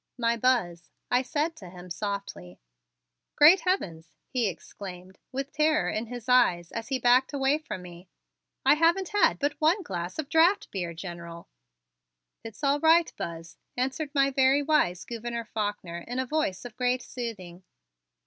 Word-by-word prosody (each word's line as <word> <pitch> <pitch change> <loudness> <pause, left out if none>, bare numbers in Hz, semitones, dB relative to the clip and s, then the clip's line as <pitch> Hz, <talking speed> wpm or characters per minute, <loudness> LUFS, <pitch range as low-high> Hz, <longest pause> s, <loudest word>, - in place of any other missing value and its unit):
"My 235 -1 +1
Buzz," 215 -9 0 0.2
I 245 +1 +4
said 300 +5 -2
to 185 - -11
him 180 0 -12
softly. 195 - -5 0.8
"Great 320 +6 +8
heavens!" 165 - -2
he 245 -4 0
exclaimed, 185 +1 -10
with 275 +2 -4
terror 310 0 +2
in 220 +2 -3
his 245 0 -8
eyes 180 -9 +3
as 230 -1 -5
he 265 - 0
backed 250 +3 +3
away 280 +2 +2
from 210 -12 -7
me. 175 0 -12 0.6
"I - - +7
haven't 335 +4 +2
had 415 - +3
but 290 +2 -2
one 340 +6 +3
glass 175 - -5
of 310 -3 -3
draft 345 +7 +3
beer, 175 -4 -4
General." 170 -1 -8 1.0
"It's 225 +4 -10
all 280 +1 +2
right, 325 +2 +4
Buzz," 165 0 -7 0.2
answered 270 +4 -2
my 275 0 +3
very 270 +2 +3
wise 190 - +1
Gouverneur 235 0 -5
Faulkner, 205 -6 -4
in 245 - -4
a 260 - 0
voice 245 -10 -2
of 230 -3 -10
great 250 0 0
soothing. 190 -8 -7
240 Hz, 160 wpm, -27 LUFS, 180-290 Hz, 1.0 s, Great